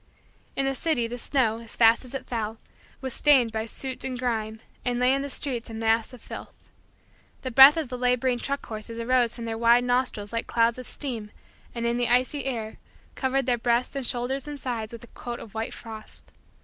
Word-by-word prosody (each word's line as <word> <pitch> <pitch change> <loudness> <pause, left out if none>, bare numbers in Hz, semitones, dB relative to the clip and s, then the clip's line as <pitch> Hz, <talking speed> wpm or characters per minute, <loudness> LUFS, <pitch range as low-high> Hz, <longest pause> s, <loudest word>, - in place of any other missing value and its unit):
In 275 - +1
the 270 - +1
city 270 -3 0
the 240 +2 -5
snow, 230 -4 +1
as 230 -1 -9
fast 230 +1 +5
as 255 - -8
it 270 - -5
fell, 225 -2 -3 0.4
was 260 -2 -4
stained 265 -6 +4
by 220 +1 -3
soot 260 +3 -2
and 255 -1 -3
grime 220 -3 -2 0.2
and 245 -1 0
lay 250 +1 +4
in 275 - +1
the 280 - -4
streets 255 -3 -3
a 225 - -7
mass 225 +1 +1
of 250 - -13
filth. - - -10 0.7
The 260 - -3
breath 270 +5 +9
of 310 -6 -2
the 250 -1 -5
laboring 250 0 +2
truck 280 +2 -3
horses 220 +1 -4
arose 240 0 +2
from 235 -1 -6
their 225 0 -3
wide 235 +1 +5
nostrils 245 -4 0
like 230 - -2
clouds 230 +1 +2
of 255 - -7
steam 235 -7 -4 0.5
and, 235 0 -2
in 235 0 +1
the 245 -1 +1
icy 255 +3 +2
air, 225 -5 -3 0.4
covered 265 0 0
their 245 -2 +1
breasts 240 +3 +1
and 275 - -2
shoulders 250 +3 0
and 295 -1 -6
sides 230 -5 -3
with 235 0 -9
a 240 - -15
coat 240 -1 -6
of 215 - -11
white 220 0 -3
frost. 220 -2 -8
245 Hz, 215 wpm, -26 LUFS, 230-260 Hz, 0.7 s, breath